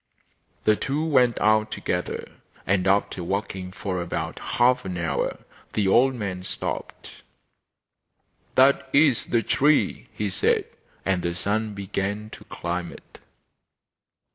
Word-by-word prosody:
The 110 Hz, -, +4 dB
two 145 Hz, +7 st, -1 dB
went 125 Hz, -6 st, +3 dB
out 110 Hz, 0 st, +3 dB
together, 90 Hz, -4 st, -3 dB, 0.3 s
and 95 Hz, -1 st, +1 dB
after 95 Hz, -2 st, +1 dB
walking 95 Hz, 0 st, -3 dB
for 95 Hz, -1 st, -3 dB
about 85 Hz, -, -4 dB
half 125 Hz, +1 st, +2 dB
an 90 Hz, -2 st, -4 dB
hour 85 Hz, -1 st, -2 dB, 0.3 s
they 105 Hz, -, +1 dB
old 130 Hz, +7 st, +4 dB
man 100 Hz, -5 st, -4 dB
stopped. 90 Hz, -, -5 dB, 1.3 s
'That 135 Hz, +2 st, +4 dB
is 140 Hz, -4 st, +4 dB
the 115 Hz, -2 st, +1 dB
tree,' 145 Hz, +7 st, +2 dB
he 105 Hz, -2 st, -3 dB
said. -, -, +2 dB, 0.4 s
And 95 Hz, -2 st, +1 dB
the 85 Hz, 0 st, -2 dB
son 105 Hz, +3 st, -1 dB
began 100 Hz, +2 st, -3 dB
to -, -, -11 dB
climb 85 Hz, 0 st, -4 dB
it. -, -, -15 dB
100 Hz, 125 wpm, -25 LUFS, 90-120 Hz, 1.3 s, The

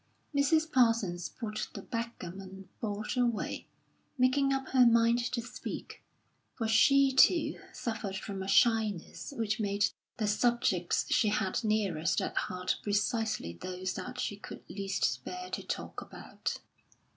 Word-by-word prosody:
Mrs. 315 Hz, +3 st, +3 dB
Parsons 225 Hz, -8 st, +2 dB
put 215 Hz, -3 st, -4 dB
the -, -, -6 dB
backgammon 195 Hz, -4 st, -6 dB
board 215 Hz, +2 st, -3 dB
away, 240 Hz, -3 st, 0 dB, 0.5 s
making 270 Hz, +2 st, +3 dB
up 270 Hz, -1 st, -1 dB
her 260 Hz, -1 st, +6 dB
mind 235 Hz, 0 st, +5 dB
to 240 Hz, -, -1 dB
speak, 240 Hz, -, -7 dB, 0.5 s
for 225 Hz, -, -2 dB
she 275 Hz, +5 st, +5 dB
too 330 Hz, +6 st, +4 dB
suffered 215 Hz, -5 st, -4 dB
from 195 Hz, 0 st, -5 dB
a 190 Hz, -, -4 dB
shyness 215 Hz, -, +2 dB
which 215 Hz, -1 st, 0 dB
made 205 Hz, -1 st, +1 dB, 0.3 s
the 220 Hz, -, 0 dB
subjects 210 Hz, -4 st, +2 dB
she 255 Hz, -4 st, +4 dB
had 205 Hz, +1 st, 0 dB
nearest 200 Hz, -7 st, +1 dB
at -, -, -3 dB
heart 180 Hz, 0 st, -1 dB
precisely 215 Hz, -, 0 dB
those 185 Hz, -, -4 dB
that 185 Hz, -, -6 dB
she 205 Hz, -, -2 dB
could -, -, -9 dB
least 195 Hz, +1 st, -1 dB
bear 365 Hz, 0 st, -6 dB
to -, -, -2 dB
talk -, -, -5 dB
about. -, -, -5 dB
220 Hz, 135 wpm, -31 LUFS, 195-245 Hz, 0.5 s, her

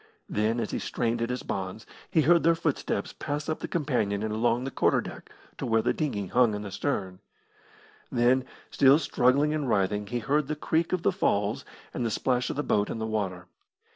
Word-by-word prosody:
Then, 110 Hz, +3 st, 0 dB
as -, -, -2 dB
he -, -, -2 dB
strained 115 Hz, -1 st, -1 dB
at 115 Hz, -, -1 dB
his 125 Hz, 0 st, -3 dB
bonds, 95 Hz, +3 st, -4 dB, 0.2 s
he 160 Hz, -, +3 dB
heard 170 Hz, +3 st, +5 dB
their 165 Hz, 0 st, +4 dB
footsteps 150 Hz, -10 st, -2 dB
pass 145 Hz, 0 st, -4 dB
up 155 Hz, -, -2 dB
the -, -, -4 dB
companion 115 Hz, -, -1 dB
and 110 Hz, -1 st, -2 dB
along 120 Hz, +2 st, +1 dB
the 135 Hz, -, -4 dB
quarter -, -, +2 dB
deck -, -, -8 dB, 0.3 s
to -, -, -2 dB
where 115 Hz, -1 st, +2 dB
the -, -, +2 dB
dinghy 130 Hz, -11 st, -2 dB
hung 115 Hz, +2 st, +3 dB
in 105 Hz, -, -5 dB
the 100 Hz, -, -7 dB
stern. 95 Hz, -5 st, -2 dB, 0.9 s
Then, 125 Hz, +2 st, +3 dB, 0.3 s
still 135 Hz, 0 st, +6 dB
struggling 140 Hz, 0 st, +2 dB
and 150 Hz, -4 st, -1 dB
writhing, 105 Hz, 0 st, +1 dB
he 120 Hz, -, -2 dB
heard 140 Hz, +4 st, 0 dB
the 155 Hz, -, -2 dB
creak 160 Hz, +2 st, 0 dB
of 185 Hz, -2 st, -1 dB
the -, -, +3 dB
falls 105 Hz, -, 0 dB, 0.3 s
and -, -, -2 dB
the 115 Hz, -, 0 dB
splash 125 Hz, +2 st, 0 dB
of -, -, -3 dB
the 145 Hz, -, -1 dB
boat 105 Hz, -6 st, +1 dB
in -, -, -3 dB
the 110 Hz, -, -3 dB
water. 95 Hz, -5 st, -3 dB
120 Hz, 210 wpm, -27 LUFS, 105-145 Hz, 0.9 s, still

